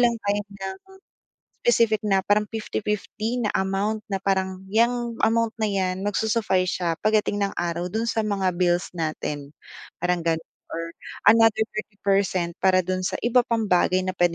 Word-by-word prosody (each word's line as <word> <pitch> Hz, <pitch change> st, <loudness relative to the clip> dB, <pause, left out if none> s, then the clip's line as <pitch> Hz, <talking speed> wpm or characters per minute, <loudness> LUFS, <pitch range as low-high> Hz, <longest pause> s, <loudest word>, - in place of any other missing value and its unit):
lang 240 Hz, -1 st, +4 dB
tayo 205 Hz, 0 st, +1 dB, 0.2 s
ng 190 Hz, 0 st, -4 dB, 0.9 s
specific 230 Hz, -, +4 dB
na 195 Hz, -1 st, +3 dB
parang 210 Hz, +2 st, +2 dB
50:50 220 Hz, +2 st, -3 dB
na 210 Hz, -, +1 dB
amount 195 Hz, +3 st, 0 dB
na 195 Hz, -, 0 dB
parang, 190 Hz, -1 st, 0 dB
"yang 235 Hz, +1 st, +1 dB
amount 230 Hz, 0 st, +2 dB
na 220 Hz, -, +1 dB
'yan, 190 Hz, 0 st, -1 dB
magsu-suffice 205 Hz, -3 st, +1 dB
siya 170 Hz, -, +1 dB
pagdating 210 Hz, -1 st, +2 dB
ng 200 Hz, -, 0 dB
araw 175 Hz, +1 st, -2 dB
do'n 225 Hz, +3 st, -1 dB
sa 225 Hz, -1 st, 0 dB
mga 200 Hz, -3 st, -1 dB
bills 175 Hz, 0 st, +1 dB
natin" 155 Hz, -3 st, -3 dB, 0.5 s
parang 180 Hz, 0 st, 0 dB
gano'n 165 Hz, -1 st, -1 dB, 0.2 s
or 165 Hz, 0 st, -5 dB, 0.4 s
another 225 Hz, -1 st, +5 dB
30% 195 Hz, -4 st, 0 dB
para 185 Hz, -1 st, +4 dB
do'n 185 Hz, +1 st, -2 dB
sa -, -, -2 dB
iba 245 Hz, +1 st, +4 dB
pang 225 Hz, -3 st, -1 dB
bagay 185 Hz, +1 st, +3 dB
na 185 Hz, -, -1 dB
puwede 175 Hz, -1 st, +2 dB
200 Hz, 160 wpm, -24 LUFS, 185-220 Hz, 0.9 s, another